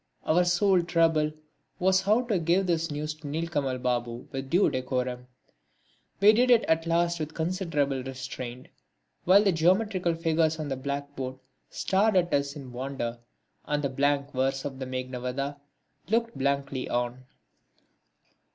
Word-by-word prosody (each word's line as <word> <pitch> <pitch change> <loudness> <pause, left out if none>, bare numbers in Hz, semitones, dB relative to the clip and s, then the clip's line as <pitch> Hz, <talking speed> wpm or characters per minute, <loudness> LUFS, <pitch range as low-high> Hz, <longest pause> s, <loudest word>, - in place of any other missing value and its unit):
Our 175 +3 +3
sole 180 +1 +3
trouble 165 -3 +2 0.5
was 190 +1 +3
how 215 +6 +3
to 220 -7 0
give 170 +4 +2
this 165 -2 0
news 150 +1 -3
to 155 -1 -11
Nilkamal 145 -4 -2
Babu 120 -1 -2
with 135 0 -5
due 180 +6 +4
decorum. 125 -1 -2 0.9
We 205 +2 +7
did 250 +3 +3
it 240 -2 +6
at 160 +1 +1
last 170 0 +1
with 155 0 -5
considerable 160 -6 -1
restraint, 130 -1 -7 0.6
while 195 +3 +6
the 200 - +4
geometrical 180 +1 +2
figures 160 -1 +1
on 155 -2 -4
the 135 - -1
blackboard 140 -1 -4 0.3
stared 200 +2 +1
at 175 -1 +2
us 140 +1 0
in 135 -4 -9
wonder 120 -2 -4 0.5
and 150 0 -1
the 140 - +1
blank 140 +1 0
verse 135 +1 -1
of 135 -2 -5
the 130 - -4
Meghnadvadha 130 +2 -4 0.5
looked 230 +1 +1
blankly 140 -1 -1
on. 120 +1 -2
150 Hz, 145 wpm, -27 LUFS, 130-175 Hz, 0.9 s, We